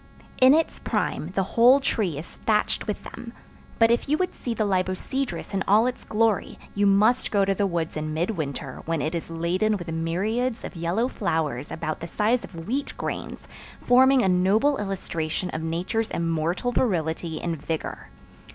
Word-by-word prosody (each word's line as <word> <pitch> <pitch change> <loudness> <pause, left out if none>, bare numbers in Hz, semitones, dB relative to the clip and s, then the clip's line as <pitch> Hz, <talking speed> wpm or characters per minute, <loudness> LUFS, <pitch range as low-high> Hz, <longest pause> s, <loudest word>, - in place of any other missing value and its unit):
In 260 +3 +8
its 325 0 0
prime 155 - -1
the 195 - +2
whole 240 +7 +5
tree 200 - -1
is 155 - -6
thatched 210 -1 0
with 210 - -3
them, 235 -1 -9 0.4
but 225 0 +5
if 235 +3 +1
you 300 - +3
would 365 0 -1
see 240 -2 -4
the 215 - 0
libocedrus 195 +8 -2
in 195 -1 0
all 215 +4 +5
its 250 0 -3
glory 220 -2 +1 0.2
you 205 0 +2
must 210 +5 +3
go 200 -2 +2
to 195 - +2
the 200 +1 +1
woods 170 -3 -2
in 155 0 -3
midwinter 155 - -3
when 165 -1 0
it 155 +3 -2
is 170 -1 -4
laden 180 +6 0
with 175 -3 -6
myriads 215 +10 -1
of - - -7
yellow 175 +8 0
flowers 155 - -2
about 155 -1 -3
the 170 - -6
size 225 +7 +1
of 165 -3 -9
wheat 275 +5 -2
grains, - - -5 0.3
forming 260 +1 +5
a - - +2
noble 200 +10 +3
illustration 180 -3 -3
of 160 - -4
Nature's 180 +8 -1
immortal 165 +7 -1
virility 165 -8 -1
and 165 -4 -3
vigor. 160 +1 -4
195 Hz, 175 wpm, -25 LUFS, 165-230 Hz, 0.4 s, In